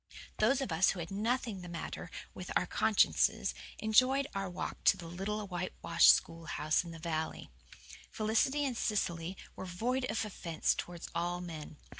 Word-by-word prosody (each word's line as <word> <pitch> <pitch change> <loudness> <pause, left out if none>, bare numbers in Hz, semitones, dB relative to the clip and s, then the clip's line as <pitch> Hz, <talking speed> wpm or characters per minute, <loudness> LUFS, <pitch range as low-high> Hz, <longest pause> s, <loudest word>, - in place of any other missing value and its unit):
Those 260 +6 +3
of 265 - -2
us 165 +4 +4
who 190 - -1
had 165 +1 -5
nothing 220 0 -1
the 175 - -8
matter 170 - -5 0.2
with - - -8
our - - +3
consciences - - +3 0.2
enjoyed 255 +6 +4
our 195 -1 -2
walk 175 - -5
to - - +6
the 170 - -9
little 195 +5 -3
whitewashed 185 -1 +4
schoolhouse 160 -1 0
in 170 - -9
the 165 - -8
valley. 160 - -3 0.6
Felicity 230 +7 +1
and 260 -3 -1
Cecily 180 -5 -1 0.2
were - - -6
void 245 +9 -1
of 225 - 0
offence 170 -6 0
towards 175 -1 -6
all 175 +1 -1
men. 160 -4 -7
185 Hz, 160 wpm, -33 LUFS, 170-220 Hz, 0.6 s, to